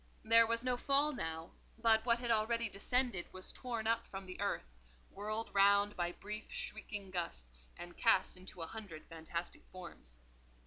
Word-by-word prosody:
There 230 +1 +7
was 230 +1 +1
no 250 -1 +1
fall 280 +4 +3
now, 160 - -4 0.3
but 225 -1 +4
what 235 0 +5
had 240 -1 -1
already 230 +1 +2
descended 225 -1 0
was 185 0 -6
torn 235 -3 -3
up 230 0 +2
from 195 0 -6
the 185 +1 -7
earth, 200 - 0 0.5
whirled 215 +3 -3
round 200 +1 +5
by 175 -1 0
brief 210 +4 -5
shrieking 215 - -4
gusts, - - -3
and 175 0 -8
cast 210 -5 +4
into 180 -2 -7
a - - -2
hundred 190 -5 -8
fantastic 165 +1 -5
forms. 170 - -9
205 Hz, 165 wpm, -36 LUFS, 175-230 Hz, 0.5 s, There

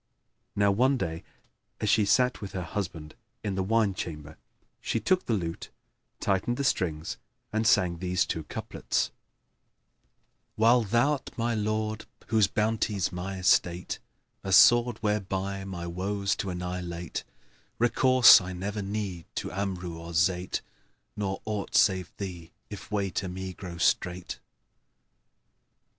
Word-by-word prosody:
Now 100 0 +3
one 130 +7 +3
day 80 -7 -3 0.6
as 110 - -1
she 105 0 +4
sat 125 +5 +2
with 100 - -7
her 90 - -3
husband 85 -5 -5 0.3
in 100 - -2
the 95 - -1
wine 105 +1 +2
chamber, 75 -4 -6 0.4
she 115 - -1
took 185 - +1
the 115 - +2
lute, 85 -4 -4 0.5
tightened 100 +5 0
the 140 - -1
strings, 80 - -1 0.4
and 110 0 +1
sang 85 -4 +3
these 90 0 +1
two 80 - -3
couplets, - - -2 1.4
"While 115 +3 +5
thou'rt 120 +7 0
my 115 0 0
lord 110 0 -2 0.2
whose 110 -3 +4
bounty's 105 -3 0
my 95 +2 -5
estate, 90 -1 +1 0.2
* - - -48
A 95 - -3
sword 120 +4 +6
whereby 100 -2 -1
my 90 -3 -5
woes 100 +4 -1
to 100 - -3
annihilate, 90 -1 -4 0.5
Recourse 120 0 +7
I 90 0 -6
never 100 +3 -4
need 100 -4 -4
to - - -3
Amru 90 -3 -4
or 85 +1 -8
Zayd,[FN#5] 90 +2 +1 0.3
* - - -47
Nor 95 -2 -2
aught 105 -2 -3
save 95 -5 +3
thee 90 -4 -6 0.2
if 105 - -8
way 100 -3 -1
to 95 0 -2
me 95 +1 -5
grow 90 -2 -8
strait!" 90 +1 0
95 Hz, 140 wpm, -28 LUFS, 90-110 Hz, 1.4 s, Recourse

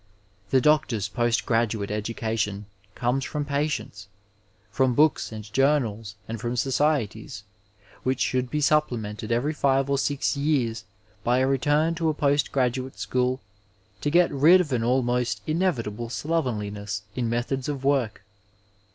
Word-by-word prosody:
The 130 - +4
doctor's 125 -8 +2
post 120 +3 0
graduate 115 -3 0
education 105 -1 -2 0.3
comes 125 +3 0
from 145 +2 -3
patients, 145 +2 -2 0.6
from 130 -2 +2
books 155 -2 +3
and 110 -1 -7
journals, 115 -7 +1
and 115 -1 -5
from 120 0 -2
societies, 135 -2 0 0.6
which 130 0 -1
should 125 -1 0
be 150 +2 -1
supplemented 120 -8 0
every 125 +7 +1
five 135 -1 +1
or 140 - +2
six 145 +1 0
years 140 -6 0 0.4
by 120 +1 +2
a 130 - +3
return 145 +4 +2
to 165 -1 0
a 155 - -1
post 145 0 +1
graduate 130 0 -1
school 125 +1 -1 0.6
to 145 - 0
get 170 +3 +4
rid 155 +7 +6
of 155 -7 -1
an 115 -2 +1
almost 120 -3 0
inevitable 120 - -1
slovenliness 105 -10 -2
in 120 -2 -1
methods 125 +3 -2
of 140 -2 -4
work. 135 -6 0
130 Hz, 140 wpm, -25 LUFS, 115-145 Hz, 0.6 s, rid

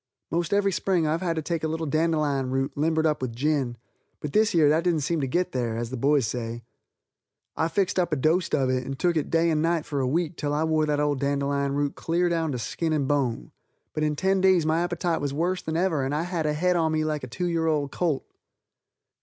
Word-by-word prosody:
Most 170 -1 -1
every 200 -1 +2
Spring 180 -2 +1
I've 155 +2 0
had 170 -3 -1
to 160 - -2
take 165 0 -2
a - - +1
little 160 +1 -2
dandelion 155 -3 +1
root, 135 +1 -1
limbered 160 +2 +1
up 155 -3 +1
with 120 -3 -3
gin, 135 -2 0 0.4
but 150 - -5
this 215 0 +4
year 160 -4 +4
that 155 +3 +3
didn't 170 -4 +1
seem 155 +2 0
to 135 - -1
get 175 +7 0
there, 120 -3 -2
as 120 0 -4
the - - -3
boys 140 +1 +2
say. 115 +1 -4 0.9
I 160 - +1
fixed 190 +1 0
up 175 -2 0
a - - +2
dost 160 +5 +1
of 135 -2 +1
it 130 0 0
and 135 +1 -5
took 175 +3 +1
it 155 - -1
day 165 0 +2
and 155 -1 +1
night 165 -1 +1
for 145 - -3
a 130 - +1
week 165 +3 -1
till 145 -1 -1
I 155 - +1
wore 155 -1 +1
that 145 -1 +1
old 145 -2 +1
dandelion 140 0 0
root 145 0 0
clear 175 +2 0
down 165 -2 0
to - - -2
skin 155 +8 -2
and 145 -3 0
bone, 125 - -1 0.4
but 155 - -2
in 150 -1 +1
ten 190 +4 +1
days 185 -4 +4
my 160 +1 +2
appetite 175 -1 -1
was 140 -1 -2
worse 180 +4 0
than 160 0 -3
ever 170 -6 +1
and 135 +2 -1
I 155 - 0
had 170 -3 -2
a 150 - +1
head 180 +4 +1
on 160 -2 +2
me 155 0 0
like 150 -2 -2
a - - -4
2 180 +9 -4
year 165 -2 0
old 150 -3 0
colt. 165 -6 -1
155 Hz, 250 wpm, -26 LUFS, 140-170 Hz, 0.9 s, this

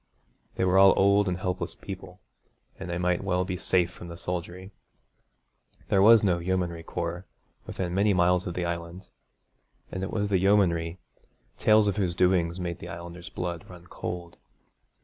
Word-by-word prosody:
They 95 - 0
were 95 +1 +4
all 95 0 +8
old 100 +1 +4
and 90 -1 -1
helpless 90 -2 -3
people, 95 -2 -9 0.6
and - - -6
they 85 - -2
might 90 0 0
well 90 -1 0
be 95 -1 -3
safe 90 -1 +1
from 90 - -11
the 85 0 -8
soldiery. 90 +2 -5 1.2
There 95 - +4
was 110 +1 +7
no 90 -4 +2
yeomanry 85 -1 -2
corps 85 +2 -5 0.4
within 90 -2 -4
many 100 +2 +3
miles 90 0 +2
of 90 - -5
the 90 - -1
Island, 85 +2 -5 0.9
and 95 - -4
it 95 - -3
was 105 -2 -1
the 95 -2 +2
yeomanry, 90 -4 +2 0.6
tales 110 -1 +5
of 100 - 0
whose 90 -4 0
doings 90 -1 +2
made 85 -1 -4
the 85 - -8
Islanders' 85 +2 -8
blood 85 -3 -5
run 90 -1 -12
cold. 85 -1 -7
90 Hz, 170 wpm, -27 LUFS, 85-95 Hz, 1.2 s, all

